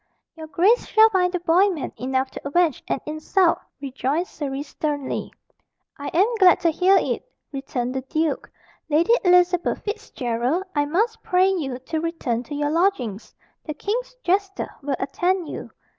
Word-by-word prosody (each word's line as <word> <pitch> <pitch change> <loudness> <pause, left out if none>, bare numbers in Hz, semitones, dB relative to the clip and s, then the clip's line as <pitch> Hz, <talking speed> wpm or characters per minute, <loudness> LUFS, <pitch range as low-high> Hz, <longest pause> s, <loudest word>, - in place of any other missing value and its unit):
"Your 320 -1 -9
grace 370 +11 +3
shall 440 0 +6
find 365 -3 +2
the 360 - -1
boy 355 +4 +4
man 325 -8 -4
enough 260 +1 -1
to - - -8
avenge 325 -1 +1
an - - -1
insult," 320 +4 +1 0.2
rejoined 275 +4 -2
Surrey 280 -5 -5
sternly. 290 -2 -3 0.6
"I 285 - -7
am 370 +4 +3
glad 365 -2 +6
to 335 -2 +3
hear 370 +4 +4
it," - - -1 0.3
returned 270 -3 -3
the 265 - -2
duke. 310 +3 -2 0.4
"Lady 330 +9 +3
Elizabeth 360 -1 +3
Fitzgerald, 255 - -2
I 290 -1 +1
must 435 +10 0
pray 365 +1 +3
you 290 -10 -2
to 285 +5 -4
return 320 -8 -2
to 295 - -6
your 290 0 0
lodgings. 320 - 0 0.3
The 305 - -5
king's 470 +10 -3
jester 390 +2 0
will 280 -1 -1
attend 355 +6 -1
you. - - -7
320 Hz, 160 wpm, -23 LUFS, 275-370 Hz, 0.6 s, shall